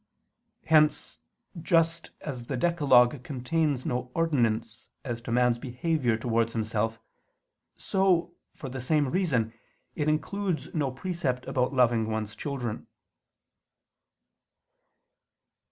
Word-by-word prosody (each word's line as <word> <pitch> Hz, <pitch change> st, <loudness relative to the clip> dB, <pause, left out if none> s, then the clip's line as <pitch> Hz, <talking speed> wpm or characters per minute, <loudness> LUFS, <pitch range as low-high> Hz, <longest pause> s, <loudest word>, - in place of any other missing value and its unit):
Hence, 155 Hz, -1 st, +3 dB, 0.4 s
just 165 Hz, 0 st, +1 dB
as 125 Hz, -5 st, -6 dB
the 135 Hz, -, -2 dB
decalogue 135 Hz, -5 st, +4 dB
contains 140 Hz, +1 st, -1 dB
no 125 Hz, 0 st, -2 dB
ordinance 115 Hz, -8 st, 0 dB, 0.2 s
as 120 Hz, -3 st, -4 dB
to 115 Hz, -, -6 dB
man's 125 Hz, 0 st, +3 dB
behavior 125 Hz, -1 st, 0 dB
towards 115 Hz, 0 st, 0 dB
himself, 110 Hz, 0 st, -1 dB, 0.8 s
so, 180 Hz, -3 st, +1 dB, 0.2 s
for 140 Hz, -, -7 dB
the 130 Hz, 0 st, -5 dB
same 145 Hz, +1 st, +2 dB
reason, 130 Hz, -, 0 dB, 0.4 s
it 150 Hz, -1 st, 0 dB
includes 165 Hz, -1 st, -2 dB
no 145 Hz, -4 st, 0 dB
precept 130 Hz, -3 st, -3 dB
about 125 Hz, 0 st, 0 dB
loving 120 Hz, -3 st, +3 dB
one's 110 Hz, -1 st, -3 dB
children. 130 Hz, -6 st, -4 dB
130 Hz, 105 wpm, -28 LUFS, 120-160 Hz, 0.8 s, decalogue